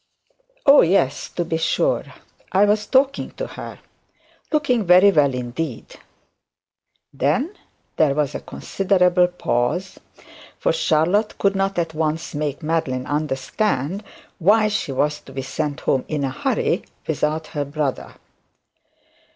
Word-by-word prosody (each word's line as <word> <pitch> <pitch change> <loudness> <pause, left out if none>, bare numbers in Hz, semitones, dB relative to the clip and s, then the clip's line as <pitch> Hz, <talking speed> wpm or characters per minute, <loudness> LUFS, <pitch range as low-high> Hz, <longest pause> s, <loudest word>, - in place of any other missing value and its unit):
'Oh, 280 +1 +8
yes, 165 -6 +1
to 175 - -3
be 165 -1 -1
sure. - - +1 0.5
I 195 +2 +4
was 210 +1 +1
talking 270 +1 +2
to - - -4
her. - - -8 0.7
Looking 255 -7 +1
very 185 +2 +6
well 145 -6 +3
indeed.' 125 +2 -5 1.2
Then 155 - 0 0.4
there 145 -3 +3
was 150 -2 0
a - - -4
considerable 180 -2 +1
pause: 175 +1 -2 0.6
for - - +1
Charlotte 205 - +1
could 200 0 +1
not 195 0 0
at 165 -2 -1
once 155 0 -2
make 145 0 -3
Madeline 145 -5 -1
understand 150 - -1 0.4
why 215 +5 +4
she 205 -8 -2
was 150 +3 0
to - - -15
be 135 0 -4
sent 145 +2 -3
home 135 -2 +1
in 150 -2 -2
a 135 - -1
hurry - - 0 0.2
without 155 +1 -1
her 145 - -1
brother. 145 -1 -3
160 Hz, 130 wpm, -21 LUFS, 145-200 Hz, 1.2 s, Oh